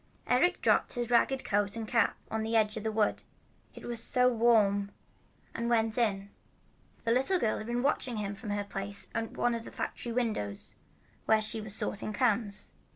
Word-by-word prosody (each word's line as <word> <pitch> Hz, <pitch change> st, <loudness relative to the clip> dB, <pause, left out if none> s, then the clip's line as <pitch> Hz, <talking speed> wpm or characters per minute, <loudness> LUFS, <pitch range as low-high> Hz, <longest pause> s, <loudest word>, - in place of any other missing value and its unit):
Eric 255 Hz, +9 st, +2 dB
dropped -, -, +3 dB
his 240 Hz, -1 st, -3 dB
ragged 260 Hz, +2 st, +3 dB
coat 205 Hz, 0 st, +1 dB
and 225 Hz, -1 st, -4 dB
cap 235 Hz, +1 st, +2 dB
on 220 Hz, -, -1 dB
the 225 Hz, +1 st, -2 dB
edge 215 Hz, -1 st, +2 dB
of 220 Hz, -, -4 dB
the 220 Hz, +1 st, -2 dB
wood, 215 Hz, -1 st, +1 dB, 0.5 s
it -, -, -10 dB
was 235 Hz, -1 st, +1 dB
so 250 Hz, +1 st, +4 dB
warm, 210 Hz, -4 st, +3 dB, 0.6 s
and 235 Hz, +1 st, -2 dB
went 225 Hz, -2 st, +2 dB
in. 200 Hz, -4 st, 0 dB, 0.7 s
A 230 Hz, -, +2 dB
little 265 Hz, +10 st, +3 dB
girl 225 Hz, -10 st, 0 dB
had 215 Hz, -, -7 dB
been 240 Hz, +1 st, -1 dB
watching 260 Hz, -3 st, 0 dB
him 205 Hz, -2 st, -3 dB
from 210 Hz, +2 st, -8 dB
her 205 Hz, 0 st, -1 dB
place 200 Hz, 0 st, -3 dB
at 225 Hz, 0 st, -4 dB
one 240 Hz, -, +1 dB
of 230 Hz, -1 st, -4 dB
the -, -, -10 dB
factory 240 Hz, -, -5 dB
windows 215 Hz, -, -3 dB, 0.5 s
where 220 Hz, 0 st, +5 dB
she 215 Hz, +1 st, 0 dB
was 210 Hz, -1 st, -3 dB
sorting 215 Hz, 0 st, -2 dB
cans. 210 Hz, -2 st, 0 dB
225 Hz, 190 wpm, -30 LUFS, 205-240 Hz, 0.7 s, where